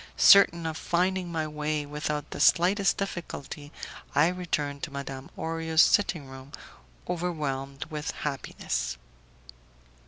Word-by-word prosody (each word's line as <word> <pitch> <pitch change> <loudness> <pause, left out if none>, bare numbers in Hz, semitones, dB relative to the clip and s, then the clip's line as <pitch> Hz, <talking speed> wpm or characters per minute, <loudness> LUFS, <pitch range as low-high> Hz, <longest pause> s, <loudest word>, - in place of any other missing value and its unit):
Certain 170 -4 +7
of 160 -1 -3
finding 180 +1 0
my 160 -2 -1
way 150 0 -2
without 150 0 -3
the - - -6
slightest 195 +3 +4
difficulty, 160 -6 -6 0.4
I 150 +3 +5
returned 150 -6 -2
to 155 - -5
Madame 135 -1 -6
Orio's 160 0 +2
sitting 175 -7 +2
room, 130 +1 -12 0.5
overwhelmed 145 -5 -3
with 150 -1 -5
happiness. 60 - -3
155 Hz, 115 wpm, -28 LUFS, 140-170 Hz, 0.5 s, Certain